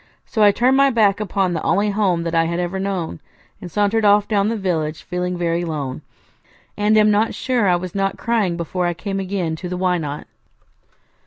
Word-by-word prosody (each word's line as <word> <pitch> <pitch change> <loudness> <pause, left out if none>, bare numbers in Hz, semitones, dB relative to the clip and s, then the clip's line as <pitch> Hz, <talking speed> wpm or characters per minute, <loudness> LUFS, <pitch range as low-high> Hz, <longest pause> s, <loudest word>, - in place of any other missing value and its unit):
So 220 - -2
I 205 -1 +7
turned 250 +5 +2
my 275 0 +5
back 210 -6 +2
upon 195 -3 -1
the 165 - -2
only 205 +1 +1
home 190 -5 +1
that 165 0 -3
I 165 0 +3
had 170 +1 -2
ever 180 +2 -2
known, 190 - -3 0.4
and 180 - -7
sauntered 210 +4 +1
off 205 0 +4
down 205 -2 +1
the 225 +1 -1
village, 160 -6 -2
feeling 180 0 -3
very 170 0 -1
lone, 145 -6 -4 0.7
and 210 +1 +2
am 215 0 +5
not 210 +2 +1
sure 245 -5 0
I 180 - +4
was 180 0 -5
not 195 0 -1
crying 215 -7 0
before 175 +1 -2
I 175 - -2
came 195 +2 -4
again 185 -4 -2
to 180 +2 -6
the 180 - -3
Why 180 -1 +1
Not? 150 -2 -5
190 Hz, 210 wpm, -20 LUFS, 170-210 Hz, 0.7 s, I